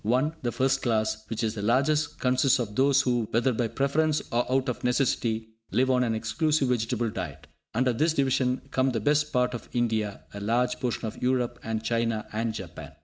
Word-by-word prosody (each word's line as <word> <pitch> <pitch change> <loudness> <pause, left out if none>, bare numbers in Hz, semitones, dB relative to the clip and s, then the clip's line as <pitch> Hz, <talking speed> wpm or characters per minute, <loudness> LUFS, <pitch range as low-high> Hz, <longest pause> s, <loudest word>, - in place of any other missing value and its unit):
(1) 130 +8 +1
The 120 - -1
first 135 +2 +1
class, 110 -2 0
which 115 +1 -3
is 110 -1 0
the 105 - -5
largest, 140 +7 +1
consists 130 +1 +3
of 110 -5 -4
those 140 +2 +4
who, 120 -4 0
whether 120 +3 +2
by 115 0 0
preference 150 +5 +1
or 120 +1 0
out 130 0 +2
of 125 - -3
necessity, 120 -3 0 0.2
live 130 +1 +2
on 125 -1 +3
an 115 -2 0
exclusive 135 +6 +1
vegetable 120 -1 0
diet. 80 -8 -6 0.3
Under 125 +1 +2
this 155 +7 +2
division 130 -2 +1
come 130 0 +1
the 115 - 0
best 150 +6 +1
part 125 0 +1
of 120 - -7
India, 110 -4 -1
a 100 - -6
large 120 +4 +1
portion 120 -2 -2
of 110 - -6
Europe, 125 -1 0
and 110 0 -3
China 115 -2 0
and 115 +1 -1
Japan. 95 -6 -8
120 Hz, 200 wpm, -27 LUFS, 110-130 Hz, 0.3 s, those